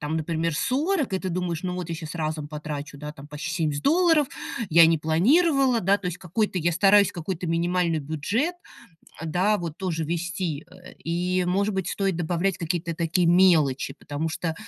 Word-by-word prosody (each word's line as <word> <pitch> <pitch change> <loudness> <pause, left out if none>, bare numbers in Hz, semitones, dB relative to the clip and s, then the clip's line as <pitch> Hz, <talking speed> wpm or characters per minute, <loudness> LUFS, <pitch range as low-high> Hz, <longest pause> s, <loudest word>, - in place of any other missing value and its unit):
там, 150 +1 -2
например, 160 0 -1
40, 285 - 0
и 190 - +1
ты 185 - -4
думаешь: 175 -1 -2
ну 180 -1 -3
вот 180 -2 -5
я - - -2
щас 160 0 -7
разом 155 -2 -3
потрачу, 150 -1 -6
да, 150 +1 -7
там 140 -1 -12
почти 150 +1 -5
70 155 -4 -1
долларов. 325 -2 +4 0.4
Я 165 +1 +8
не 165 - +3
планировала, 255 - +3
да, 195 +3 +2
то 190 - -6
есть 180 0 -3
какой-то, 190 +3 -2
я 170 +1 +1
стараюсь, 200 +3 +5
какой-то 175 +1 -4
минимальный 170 0 +1
бюджет, 170 - -1 0.7
да, 185 +6 +1
вот 165 -4 -6
тоже 170 -4 -2
вести. 170 -1 -3 0.4
И, 180 +2 0
может 200 +3 +1
быть, 190 -2 -2
стоит 195 -4 -1
добавлять 175 +2 -1
какие-то 170 0 -2
такие 170 +2 0
мелочи, 160 -7 +3
потому 150 +3 -4
что 160 +1 -3
170 Hz, 175 wpm, -25 LUFS, 160-190 Hz, 0.7 s, Я